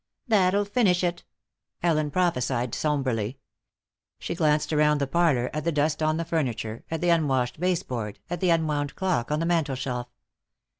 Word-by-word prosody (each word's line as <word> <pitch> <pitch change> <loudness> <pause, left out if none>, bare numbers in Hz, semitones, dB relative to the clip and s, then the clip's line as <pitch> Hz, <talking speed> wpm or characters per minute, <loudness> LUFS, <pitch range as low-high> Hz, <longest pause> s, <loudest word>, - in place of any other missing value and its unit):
"That'll 200 -2 +3
finish 200 -4 +2
it," 175 -1 -1 0.6
Ellen 155 -3 +2
prophesied, 125 -8 0
somberly. 130 -6 -1 0.8
She - - -4
glanced 155 -2 +1
around 150 0 +4
the 140 - +1
parlor, 140 -5 +1
at 155 0 -3
the 170 - +1
dust 150 +1 0
on 155 0 +2
the 165 - -2
furniture, 120 -9 -2
at 165 -1 -3
the 175 - +2
unwashed 135 -7 +1
baseboard, 125 - -2
at 175 -1 -4
the 185 - +1
unwound 150 -4 0
clock 180 -11 0
on 150 - +1
the 165 - 0
mantel 165 -5 +1
shelf. 125 -2 -3
155 Hz, 160 wpm, -26 LUFS, 130-170 Hz, 0.8 s, around